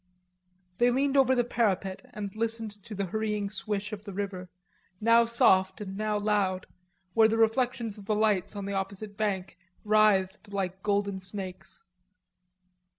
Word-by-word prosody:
They 240 Hz, +1 st, +5 dB
leaned 270 Hz, +3 st, +1 dB
over 260 Hz, -1 st, +5 dB
the 245 Hz, -, +3 dB
parapet 200 Hz, -5 st, 0 dB
and 205 Hz, -3 st, -6 dB
listened 225 Hz, -2 st, -3 dB
to 220 Hz, -, -7 dB
the 200 Hz, 0 st, -1 dB
hurrying 210 Hz, +1 st, -2 dB
swish 210 Hz, -1 st, -3 dB
of 205 Hz, -1 st, -6 dB
the 200 Hz, -2 st, -8 dB
river, 190 Hz, -2 st, -4 dB, 0.5 s
now 230 Hz, +1 st, +5 dB
soft 190 Hz, -5 st, +3 dB
and 195 Hz, -2 st, -6 dB
now 210 Hz, 0 st, -1 dB
loud, 205 Hz, -3 st, 0 dB, 0.5 s
where 225 Hz, -1 st, +6 dB
the 225 Hz, +1 st, 0 dB
reflections 225 Hz, -1 st, +1 dB
of 200 Hz, -, -12 dB
the 215 Hz, 0 st, 0 dB
lights 210 Hz, -3 st, +1 dB
on 200 Hz, -1 st, -4 dB
the 200 Hz, -, -3 dB
opposite 200 Hz, +1 st, -4 dB
bank 195 Hz, -4 st, -2 dB, 0.3 s
writhed 210 Hz, -2 st, +3 dB
like 190 Hz, -1 st, -3 dB
golden 200 Hz, -1 st, 0 dB
snakes. 190 Hz, -2 st, -7 dB
210 Hz, 150 wpm, -28 LUFS, 195-220 Hz, 0.5 s, where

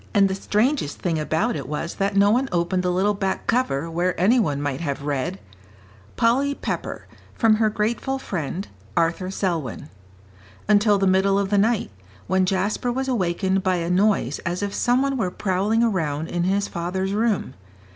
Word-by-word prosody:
And 200 Hz, -1 st, +6 dB
the 190 Hz, -, -2 dB
strangest 210 Hz, -, 0 dB
thing 165 Hz, -3 st, -1 dB
about 160 Hz, +10 st, 0 dB
it 140 Hz, -4 st, -5 dB
was 150 Hz, +3 st, -3 dB
that 200 Hz, +1 st, -1 dB
no 200 Hz, +1 st, +5 dB
one 255 Hz, +4 st, +1 dB
opened 175 Hz, +1 st, 0 dB
the 180 Hz, -, 0 dB
little 190 Hz, +3 st, +2 dB
back 195 Hz, -1 st, -2 dB
cover 165 Hz, -, 0 dB
where 175 Hz, +2 st, -1 dB
any 220 Hz, +8 st, +4 dB
one 145 Hz, -10 st, 0 dB
might 145 Hz, -1 st, -2 dB
have 140 Hz, -3 st, -3 dB
read: 135 Hz, -8 st, -2 dB, 0.8 s
"Polly 270 Hz, +5 st, +2 dB
Pepper, -, -, -4 dB, 0.3 s
from 220 Hz, -2 st, +4 dB
her 220 Hz, -1 st, +3 dB
grateful 230 Hz, +6 st, -1 dB
friend, 185 Hz, -, -4 dB, 0.3 s
Arthur 170 Hz, +3 st, +1 dB
Selwyn." 170 Hz, -, -3 dB, 0.8 s
until 205 Hz, 0 st, +4 dB
the 195 Hz, -, +1 dB
middle 190 Hz, +1 st, +3 dB
of 200 Hz, 0 st, -1 dB
the 205 Hz, -, +4 dB
night, 215 Hz, -, +1 dB, 0.3 s
when 185 Hz, 0 st, +1 dB
Jasper 200 Hz, +6 st, 0 dB
was 265 Hz, +2 st, -2 dB
awakened 190 Hz, -4 st, 0 dB
by 185 Hz, -1 st, +1 dB
a 170 Hz, 0 st, -2 dB
noise 190 Hz, -, +2 dB
as 175 Hz, +3 st, -3 dB
if 200 Hz, 0 st, -3 dB
some 245 Hz, +2 st, +2 dB
one 275 Hz, -1 st, 0 dB
were 215 Hz, -7 st, 0 dB
prowling 200 Hz, +5 st, 0 dB
around 160 Hz, -8 st, -1 dB
in 175 Hz, 0 st, -1 dB
his 200 Hz, +2 st, +1 dB
father's 190 Hz, +3 st, -3 dB
room. 215 Hz, -, 0 dB
190 Hz, 175 wpm, -23 LUFS, 170-215 Hz, 0.8 s, And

